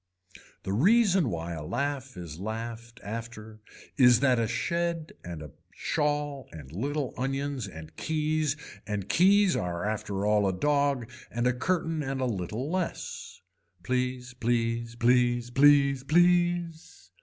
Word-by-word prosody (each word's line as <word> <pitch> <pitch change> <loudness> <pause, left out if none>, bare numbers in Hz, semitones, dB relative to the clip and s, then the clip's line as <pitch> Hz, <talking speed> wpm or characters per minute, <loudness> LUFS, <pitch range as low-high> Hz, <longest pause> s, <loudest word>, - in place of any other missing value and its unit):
The 95 - -2
reason 190 - +4
why 85 -2 -4
a 80 -2 -5
laugh 135 - -3
is 85 -3 -8
laughed 115 +2 -6
after 110 0 -7 0.4
is 125 -3 +7
that 130 -3 +4
a 115 - +1
shed 170 - -1
and 85 -3 -7
a 75 - -10 0.2
shawl 145 -2 -1
and 75 -4 -10
little 140 - -2
onions 135 -2 -2
and 80 -3 -11
keys 155 -1 0 0.3
and 105 -3 -3
keys 195 +1 +4
are 90 +1 -2
after 105 -2 -2
all 105 -1 +3
a 95 - +1
dog 140 -4 +1 0.2
and 120 +2 -2
a 125 - +3
curtain 165 +3 -1
and 135 -1 -3
a 130 - 0
little 110 +3 -3
less. 185 -1 -4 0.4
Please 125 +1 -2
please 115 -1 -1
please 120 0 +2
please 140 0 +5
please. 175 - +1
125 Hz, 135 wpm, -28 LUFS, 110-150 Hz, 0.4 s, is